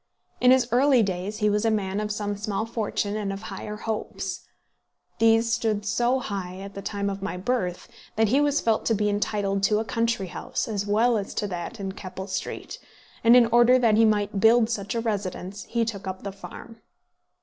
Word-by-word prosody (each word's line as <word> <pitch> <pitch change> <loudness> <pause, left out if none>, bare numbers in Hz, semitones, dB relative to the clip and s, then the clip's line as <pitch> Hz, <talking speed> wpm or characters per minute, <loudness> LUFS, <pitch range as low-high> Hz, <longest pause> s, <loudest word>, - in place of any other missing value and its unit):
In 250 - +5
his 255 -1 +5
early 255 0 +4
days 195 +2 -3
he 210 -1 +2
was 210 +1 +1
a 225 - +3
man 200 -2 -1
of 210 0 -2
some 205 -1 -2
small 205 +1 -2
fortune 215 -2 -2
and 205 -2 -2
of 195 - -5
higher 210 +2 -6
hopes. 195 -4 -4 0.8
These 225 0 +4
stood 220 -3 0
so 240 +4 +1
high 195 -7 -5
at 200 0 -8
the 200 - -7
time 200 0 -3
of 195 -1 -3
my 195 -2 -3
birth, 185 -3 -2 0.3
that 220 -1 +2
he 270 +6 +3
was 290 0 +2
felt 225 -2 +1
to 225 - +3
be 210 0 +1
entitled 205 -1 -1
to 210 +2 +3
a 220 - -1
country 230 -1 0
house, - - -4
as 205 -2 -3
well 225 +2 +3
as 200 - -6
to - - -1
that 180 +6 -5
in 195 -1 -3
Keppel 190 -1 -7
Street; 185 -1 -5 0.4
and 230 +1 +7
in 245 -1 +7
order 240 +2 +6
that 235 -4 +3
he 225 - +5
might 205 -2 +1
build 225 +2 +5
such 205 -1 -3
a 230 - 0
residence, 200 -3 -4
he 235 -1 0
took 205 -4 -5 0.2
the 200 - -4
farm. 225 +3 -11
210 Hz, 205 wpm, -25 LUFS, 200-230 Hz, 0.8 s, and